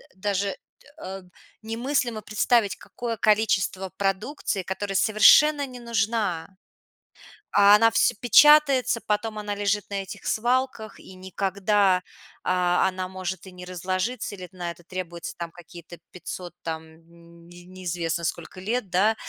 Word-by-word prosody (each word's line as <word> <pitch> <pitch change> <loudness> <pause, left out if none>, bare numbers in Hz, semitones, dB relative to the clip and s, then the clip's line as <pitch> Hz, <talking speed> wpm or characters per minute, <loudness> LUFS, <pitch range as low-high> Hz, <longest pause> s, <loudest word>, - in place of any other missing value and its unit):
даже, 200 0 -1
дэ 195 - -4 0.5
э, 190 +1 -6 0.4
немыслимо 235 0 -1
представить, 215 0 +1
какое 230 -2 -6
количество 200 -3 +1
продукции, 200 +3 -2
которая 195 +2 -4
совершенно 285 +9 +5
не 250 -2 -10
нужна. 215 -6 -1 1.1
А 205 0 +7
она 225 +2 +5
всё - - +3
печатается, 275 0 +5
потом 215 +1 -1
она 205 -1 -4
лежит 205 0 -1
на 200 -1 -3
этих 190 - -10
свалках, 240 -2 -1
и 185 - -13
никогда, 190 0 +1 0.4
а, 180 0 +2
она 185 0 -3
может 185 0 -6
и 190 - -10
не 180 0 -10
разложиться, 185 +6 -3
или 185 -1 -9
на 180 -2 -5
это 175 - -14
требуется 175 -1 -6
там 170 -1 -5
какие-то 170 0 -13
500 180 -1 -8
там 160 -1 -4
нь 170 0 -19
не 175 0 -14
неизвестно 175 -2 -3
сколько 170 +2 -5
лет, 215 +2 -2
да. 205 +5 +3
195 Hz, 135 wpm, -25 LUFS, 180-220 Hz, 1.1 s, А